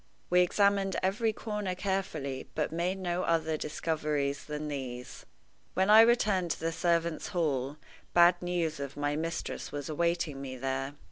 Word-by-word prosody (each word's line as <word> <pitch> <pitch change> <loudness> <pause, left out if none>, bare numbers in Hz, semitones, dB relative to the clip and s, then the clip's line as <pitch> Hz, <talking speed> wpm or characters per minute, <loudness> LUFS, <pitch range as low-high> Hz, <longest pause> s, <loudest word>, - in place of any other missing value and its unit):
We 180 0 +6
examined 200 +1 +2
every 215 +4 +1
corner 210 -3 -3
carefully, 160 -9 -3
but 150 - -1
made 175 +3 -1
no 180 -1 -1
other 160 -2 +1
discoveries 150 -2 -2
than 150 0 -4
these. 130 -4 -6 0.5
When 190 +2 +3
I 220 +1 +10
returned 210 -6 +3
to - - -2
the 165 +1 -1
servants' 170 -1 0
hall, 145 -6 -1 0.4
bad 175 0 +6
news 175 -4 -1
of 140 0 -6
my 145 0 0
mistress 165 +2 -4
was 145 -1 -5
awaiting 170 -3 0
me 130 -1 -6
there. 135 +2 -2
165 Hz, 150 wpm, -30 LUFS, 145-185 Hz, 0.5 s, I